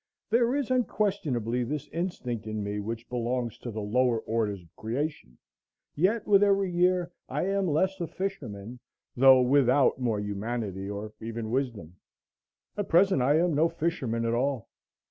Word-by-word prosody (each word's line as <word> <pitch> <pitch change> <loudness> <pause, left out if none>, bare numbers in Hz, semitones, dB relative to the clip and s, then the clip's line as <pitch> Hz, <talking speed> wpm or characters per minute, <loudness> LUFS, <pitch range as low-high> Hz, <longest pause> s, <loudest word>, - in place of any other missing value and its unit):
There 235 +2 +3
is 280 -3 -1
unquestionably 155 - 0
this 145 +4 -4
instinct 125 - -4
in 110 -1 -3
me 100 +1 -3
which 115 +3 -5
belongs 120 -1 -2
to 120 - -6
the 110 -2 -4
lower 120 +2 +2
orders 105 -5 -2
of 85 +2 -24
creation; 120 - -4 0.6
yet 200 +8 +1
with 200 -1 +5
every 195 -2 +3
year 180 0 +2 0.2
I - - -1
am 195 0 0
less 185 +5 +1
a 170 - -1
fisherman, 125 - -5 0.4
though 130 0 +7
without 135 +1 +3
more 115 -4 0
humanity 105 -1 -4
or 105 +1 -6
even 115 0 -5
wisdom; 115 - -3 0.8
at 205 -2 -3
present 180 -4 +4
I 140 +4 +4
am 170 0 +2
no 160 +3 +3
fisherman 150 -9 -2
at 115 - 0
all. 130 -1 -1
125 Hz, 155 wpm, -28 LUFS, 110-175 Hz, 0.8 s, though